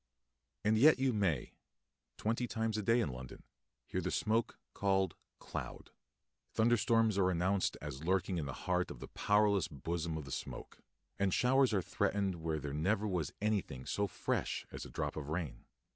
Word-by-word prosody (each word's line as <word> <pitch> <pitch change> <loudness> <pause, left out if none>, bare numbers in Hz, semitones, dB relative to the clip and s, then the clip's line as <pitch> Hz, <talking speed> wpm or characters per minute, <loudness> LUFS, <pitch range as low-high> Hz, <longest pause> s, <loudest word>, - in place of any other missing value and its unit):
And 110 0 +4
yet 150 +5 +7
you 130 -1 +2
may, 95 - 0 0.6
twenty 115 +3 0
times 110 -1 -1
a 110 - 0
day 115 +4 +3
in 110 - 0
London, 65 0 -9 0.4
hear - - -2
the - - -1
smoke 110 +2 0 0.2
called 95 -1 +1 0.2
cloud. - - -6 0.6
Thunderstorms 115 -2 +3
are 95 -1 +4
announced 95 +2 +1
as 65 +4 -6
lurking 95 0 +1
in 75 - -3
the 70 - -4
heart 90 -1 +1
of - - -8
the - - -8
powerless 105 -3 +3
bosom 80 +2 -3
of 75 - -6
the 70 - -9
smoke, - - -6 0.4
and 95 -1 +2
showers 130 +4 +4
are 100 -4 +1
threatened 95 -1 0
where 80 -1 -1
there 70 -1 -5
never 95 +8 +1
was 90 -7 -1
anything 95 -12 -1
so 100 0 0
fresh - - -2
as - - -6
a - - -9
drop - - -3
of 75 -2 -5
rain. 80 -3 -3
95 Hz, 175 wpm, -35 LUFS, 80-110 Hz, 0.6 s, yet